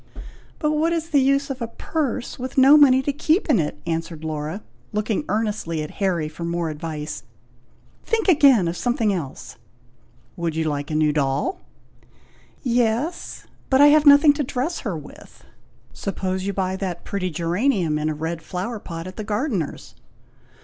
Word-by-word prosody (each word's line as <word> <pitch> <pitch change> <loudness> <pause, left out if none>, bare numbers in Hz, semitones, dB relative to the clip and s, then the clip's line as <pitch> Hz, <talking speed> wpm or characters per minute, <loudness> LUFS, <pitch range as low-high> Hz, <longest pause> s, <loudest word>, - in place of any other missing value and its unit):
"But 300 -1 0
what 315 +2 +1
is 330 -1 -2
the 285 -3 +4
use 275 +1 +2
of 260 -1 -6
a 235 - -2
purse, 260 0 -3
with 255 +1 -6
no 270 +3 +8
money 265 -3 +6
to 285 - -1
keep 315 +6 +1
in 230 - +4
it!" 150 -2 -2
answered 165 -1 -4
Laura, 155 +5 -4 0.3
looking 210 0 -1
earnestly 205 -7 -1
at 150 - -7
Harry 175 -5 +1
for 155 +2 -8
more 170 -1 -2
advice. 150 0 -5 0.8
"Think 450 -2 0
again 275 - +5
of 170 - -2
something 240 -1 0
else." 155 -8 -6 0.8
"Would 170 -2 -2
you 160 - 0
like 145 -2 -2
a 155 - -2
new 155 -1 +2
doll?" 140 - -1 1.0
"Yes; 245 +6 -1 0.2
but 265 - +4
I 290 +1 +8
have 300 0 +5
nothing 285 +1 +8
to 295 0 -2
dress 275 +6 -2
her 200 - -3
with!" 150 - -14 0.5
"Suppose 190 +5 -3
you - - 0
buy 190 -1 -1
that 185 -3 -4
pretty 185 -2 -3
geranium 175 - 0
in 155 +1 -1
a 155 - -2
red 165 +2 -4
flower 190 +7 -4
pot 165 -3 -7
at 185 0 -9
the 215 - -4
gardener's!" 210 - -3
200 Hz, 170 wpm, -22 LUFS, 165-270 Hz, 1.0 s, no